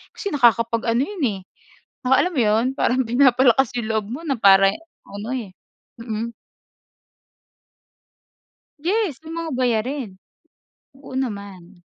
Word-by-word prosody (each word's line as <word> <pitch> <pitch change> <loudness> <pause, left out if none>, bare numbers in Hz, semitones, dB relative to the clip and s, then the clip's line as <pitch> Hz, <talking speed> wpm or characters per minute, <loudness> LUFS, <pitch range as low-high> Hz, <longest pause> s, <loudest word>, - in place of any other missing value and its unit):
Kasi 405 - -4
nakakapag-ano 230 -2 +2
'yon, 380 0 -5
eh, 200 -4 -3 0.6
naka 255 +1 +4
alam 360 - -1
mo 260 - +2
'yon, 215 +2 +2
parang 255 -1 +1
pinapalakas 255 0 +4
yung 225 - -4
loob 220 -2 -1
mo 265 +6 -5
na 275 - +1
para 195 -1 +6 0.4
ano, 205 +3 -7
eh. 210 -7 -6 0.5
Mm. 230 0 -4 2.5
Yes! 350 - -1
Yung 325 +1 -8
mga 330 -1 -4
bayarin. 250 +1 -1 0.9
Oo, 275 - -12
naman. 200 -8 -6
240 Hz, 120 wpm, -22 LUFS, 215-275 Hz, 2.5 s, para